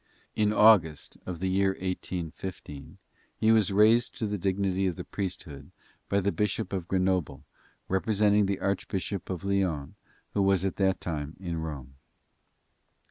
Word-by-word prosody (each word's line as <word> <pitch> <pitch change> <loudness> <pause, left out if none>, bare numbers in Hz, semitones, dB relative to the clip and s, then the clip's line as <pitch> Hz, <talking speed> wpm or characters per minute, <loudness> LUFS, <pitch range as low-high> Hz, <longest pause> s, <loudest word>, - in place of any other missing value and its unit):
In 105 -1 +2
August, 105 -8 +4
of 90 -3 -4
the 95 - -1
year 95 +1 +2
1815, 90 -5 -6 0.4
he 110 - +3
was 110 -4 +4
raised 110 +4 +4
to 110 - -2
the 105 -1 -2
dignity 95 0 0
of 90 - -2
the - - -6
priesthood 85 -8 -6 0.4
by 100 - +2
the 100 +1 +1
bishop 105 +1 -1
of 90 -3 -3
Grenoble, 90 -7 0 0.4
representing 105 +1 +2
the 100 -1 -2
archbishop 100 -1 -2
of 90 -2 -4
Lyons, 95 -8 -1 0.4
who 100 - +1
was 95 -1 +3
at 95 - -2
that 95 -1 +2
time 75 -2 -4
in 85 -3 -4
Rome. 70 -5 -6
95 Hz, 145 wpm, -28 LUFS, 85-100 Hz, 0.4 s, August